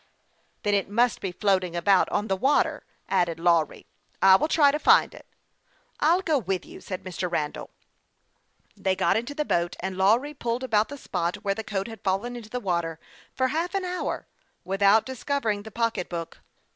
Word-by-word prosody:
" - - -42
Then 205 - +1
it 200 -1 +1
must 235 +3 +2
be 190 - -3
floating 185 -2 0
about 185 +2 +3
on 205 +1 -1
the 195 - +1
water," 270 +9 +1 0.2
added 170 -2 0
Lawry. 165 -2 +1 0.2
" - - -39
I 190 0 +7
will 250 - +2
try 295 -3 +5
to 300 - -2
find - - +5
it." - - -14 0.4
" - - -40 0.3
I'll 340 +5 +3
go 310 -5 +2
with 190 -4 -3
you," - - -12
said 185 -2 -6
Mr. 180 -1 -4
Randall. 150 -3 -3 1.1
They 190 -1 0
got 190 - +2
into 240 +6 -2
the 300 0 -1
boat, 175 -6 0
and 190 0 -4
Lawry 225 +10 +2
pulled 240 -2 -3
about 220 -4 +2
the 285 - -7
spot 175 -8 -2
where 200 -1 +1
the 220 - -6
coat 195 -1 -3
had 225 -3 -10
fallen 200 +6 -1
into 230 -3 -9
the 250 - -3
water 170 -6 -2 0.4
for 260 0 +1
half 335 +7 -2
an 385 -1 -1
hour 360 0 -3 0.4
without 200 +3 +3
discovering 260 -5 -2
the 220 - -10
pocketbook. 190 -7 -3
205 Hz, 195 wpm, -26 LUFS, 185-255 Hz, 1.1 s, I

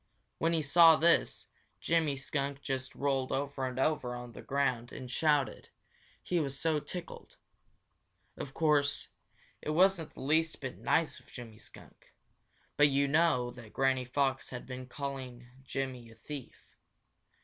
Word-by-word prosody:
When 165 +1 +2
he 160 -2 +1
saw 165 +3 +7
this, 170 +2 +3 0.3
Jimmy 160 -4 +1
Skunk 140 0 -3
just 130 -1 -3
rolled 135 -2 0
over 135 -1 -1
and 130 0 -6
over 130 -3 0
on 120 0 -7
the - - -10
ground 130 -4 -1
and 125 -1 -8
shouted, 150 -1 +1 0.5
he 175 - 0
was 140 -3 -3
so 160 -1 +1
tickled. 170 +4 -8 1.0
Of 135 - -7
course, 150 -3 +2 0.5
it - - -5
wasn't 175 0 +3
the - - -9
least 160 +4 +1
bit 135 -2 -6
nice - - +1
of - - -21
Jimmy 115 -3 -10
Skunk, - - -15 0.6
but 145 - +7
you 140 0 +2
know 140 -5 +3
that 120 -3 -13
Granny 130 -1 +2
Fox 135 +1 0
had 125 -1 -7
been 130 -1 -7
calling 130 -3 -6 0.2
Jimmy 130 -3 -4
a 115 - -15
thief. 135 +3 -9
140 Hz, 150 wpm, -32 LUFS, 130-150 Hz, 1.0 s, saw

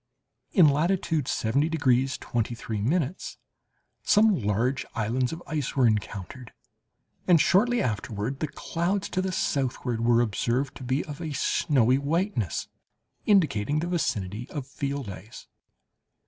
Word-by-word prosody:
In 175 -7 +6
latitude 160 -1 +1
70 140 +8 +1
degrees 135 -4 +2
23' 115 -2 -3 1.2
some 215 +1 +4
large 120 - 0
islands 120 +2 0
of 165 +1 -7
ice 150 -4 -3
were 130 -2 +4
encountered, 110 +2 -2 0.7
and 175 -3 +6
shortly 235 +7 +3
afterward 110 +3 -3
the 155 - -1
clouds 180 +7 -2
to 185 - -1
the 190 0 -2
southward 130 -7 -1
were 120 0 +4
observed 120 +5 0
to - - -9
be 130 +4 -1
of 150 0 -8
a 155 -3 -4
snowy 130 -2 +2
whiteness, 145 - -1 0.6
indicating 145 - +3
the 160 - 0
vicinity 115 - -2
of 145 -4 -5
field 140 -1 -4
ice. 100 +4 -10
135 Hz, 125 wpm, -26 LUFS, 115-160 Hz, 1.2 s, In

